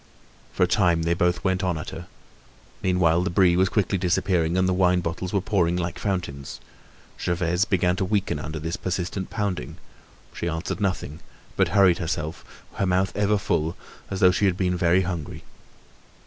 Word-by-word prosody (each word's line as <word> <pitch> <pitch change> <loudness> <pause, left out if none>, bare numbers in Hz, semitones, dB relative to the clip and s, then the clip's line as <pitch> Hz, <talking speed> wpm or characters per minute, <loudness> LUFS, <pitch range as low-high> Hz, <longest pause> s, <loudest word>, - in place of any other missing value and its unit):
For - - +1
a - - +4
time 90 -3 +2
they 85 +1 +2
both 90 +1 0
went 95 0 0
on 90 -3 0
at 80 - -6
her. - - -8 0.7
Meanwhile, 90 -2 +2
the 95 - -1
Brie 90 0 +4
was 95 +1 +3
quickly 100 -2 0
disappearing 90 -2 +1
and 95 0 +3
the 95 - +2
wine 90 -1 +3
bottles 90 +2 -4
were 100 - +1
pouring 90 -4 +1
like 85 -1 -3
fountains. 90 -9 -4 0.6
Gervaise 85 +2 +1
began 90 -3 +1
to 95 - 0
weaken 100 0 0
under 80 +1 -5
this 80 +2 -3
persistent 90 +1 -3
pounding. 100 - -3 0.6
She 85 - -3
answered 85 +4 -4
nothing, 95 -6 -2 0.4
but - - +3
hurried 95 -3 +4
herself, 80 -2 -3 0.3
her 100 - +1
mouth 95 +1 +1
ever 105 +1 +2
full, 85 -5 -1 0.3
as 95 - -4
though 90 - +7
she 95 +3 +1
had 95 -2 +2
been 90 -1 0
very 90 +1 +3
hungry. 85 -5 -5
90 Hz, 175 wpm, -24 LUFS, 85-95 Hz, 0.7 s, though